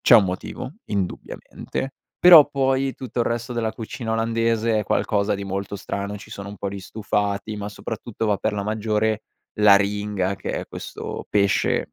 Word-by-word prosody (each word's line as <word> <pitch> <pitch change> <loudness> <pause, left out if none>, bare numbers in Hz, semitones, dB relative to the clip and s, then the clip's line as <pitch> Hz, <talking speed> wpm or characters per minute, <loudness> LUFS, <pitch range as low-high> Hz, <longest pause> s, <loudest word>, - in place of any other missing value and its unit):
c'è 120 - +8
un 105 - +5
motivo 90 0 -5
indubbiamente; 100 +6 -4 0.3
però, 165 -5 +9
poi, 135 -1 +1
tutto 125 -2 -4
il - - +1
resto 115 +1 -2
della 115 -2 -1
cucina 115 0 -6
olandese 115 0 +1
è - - -1
qualcosa 105 0 +1
di 100 - -5
molto 100 +1 -3
strano, 100 +1 -4
ci - - -12
sono 100 0 -7
un 100 - -8
po' 100 - -3
di 100 0 -6
stufati, 105 +1 -2
ma, 100 0 -4
soprattutto, 110 +2 -5
va 105 -2 +2
per - - -1
la 100 - -2
maggiore 110 0 0 0.4
l'aringa, 100 -1 +3
che - - -5
è - - -3
questo - - -7
pesce 100 -1 +2
105 Hz, 170 wpm, -23 LUFS, 100-115 Hz, 0.4 s, però